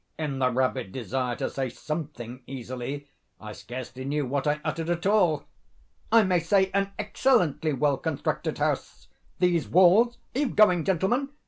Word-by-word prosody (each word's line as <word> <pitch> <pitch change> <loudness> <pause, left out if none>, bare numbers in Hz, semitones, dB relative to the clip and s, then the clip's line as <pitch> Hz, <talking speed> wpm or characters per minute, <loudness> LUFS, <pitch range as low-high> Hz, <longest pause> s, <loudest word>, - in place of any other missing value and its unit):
(In 145 -4 -3
the 130 -1 +3
rabid 125 -6 -1
desire 125 0 -2
to - - -2
say 135 -2 -3
something 135 -4 -6
easily, 130 +2 -6 0.3
I 110 -1 -8
scarcely 130 +3 -8
knew 145 +1 -1
what 140 +2 -2
I 150 +1 +1
uttered 165 0 -2
at 175 +1 -1
all.)—"I 175 - 0
may 185 -2 +2
say 190 +3 +2
an 200 0 +1
excellently 205 - +1
well 140 +1 +1
constructed 160 -1 -2
house. - - -2 0.3
These 175 -3 +2
walls—are 215 +9 +3
you 290 - +2
going, 180 -7 +4
gentlemen? 195 - +1
150 Hz, 145 wpm, -26 LUFS, 130-190 Hz, 0.3 s, going